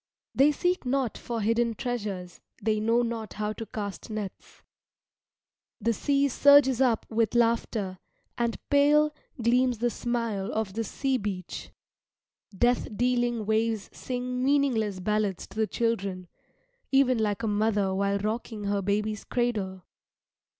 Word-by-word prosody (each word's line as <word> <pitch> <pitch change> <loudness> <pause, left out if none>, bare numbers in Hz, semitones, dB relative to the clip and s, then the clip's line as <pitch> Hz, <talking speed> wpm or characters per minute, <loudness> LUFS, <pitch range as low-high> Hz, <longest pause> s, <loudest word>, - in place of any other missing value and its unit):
They 280 +3 +5
seek 355 +5 0
not 260 -2 0
for 235 -2 -4
hidden 230 +2 +1
treasures, 210 -8 -4 0.2
they 215 0 0
know 230 +3 +2
not 230 -3 -4
how 210 0 -2
to 225 0 -7
cast 205 -1 -6
nets. 210 -3 -7 1.2
The 230 - +1
sea 280 +4 +2
surges 275 -1 +5
up 240 -4 +2
with 225 0 +1
laughter, 230 -5 +1 0.4
and 235 -1 -1
pale 300 +1 +5 0.3
gleams 245 +1 +2
the 240 +2 0
smile 230 -4 -2
of 215 -3 -2
the 225 +2 -1
sea 265 +4 -1
beach. 195 -4 -5 0.8
Death 240 +5 +2
dealing 240 -2 +1
waves 220 0 0
sing 250 0 -3
meaningless 255 -8 +2
ballads 210 -1 -1
to - - -16
the 220 0 +1
children, 195 -6 -2 0.6
even 265 -3 +4
like 215 0 0
a - - +1
mother 205 -2 +1
while 200 +1 +1
rocking 215 +1 -3
her 200 0 0
baby's 210 +2 -1
cradle. 205 -7 -2
225 Hz, 135 wpm, -27 LUFS, 205-245 Hz, 1.2 s, They